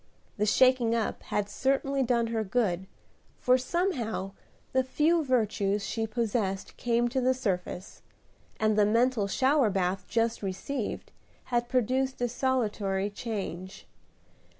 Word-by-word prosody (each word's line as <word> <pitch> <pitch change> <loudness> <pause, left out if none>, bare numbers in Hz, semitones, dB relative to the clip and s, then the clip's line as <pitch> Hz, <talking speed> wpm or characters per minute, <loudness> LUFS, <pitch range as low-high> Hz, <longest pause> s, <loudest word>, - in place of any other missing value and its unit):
The 210 +1 +1
shaking 250 0 +4
up 225 -2 -1
had 205 -1 -2
certainly 270 +5 0
done 235 -2 +2
her 220 -1 0
good, 190 -4 0 0.5
for 250 - +4
somehow 255 - -1 0.4
the 260 0 +3
few 310 +5 +2
virtues 210 -6 +1
she 225 -1 -2
possessed 215 -4 -2
came 240 0 +1
to 260 +2 0
the 255 +1 +3
surface, 185 -6 -3 0.6
and 215 0 +2
the 210 -1 +4
mental 230 -1 +2
shower 265 +3 +3
bath 190 -1 -1
just 230 0 0
received 205 +5 -4 0.4
had 240 0 +1
produced 260 +2 +1
a 245 - +1
salutary 210 -6 0
change. 195 -4 -5
230 Hz, 125 wpm, -29 LUFS, 205-255 Hz, 0.6 s, shaking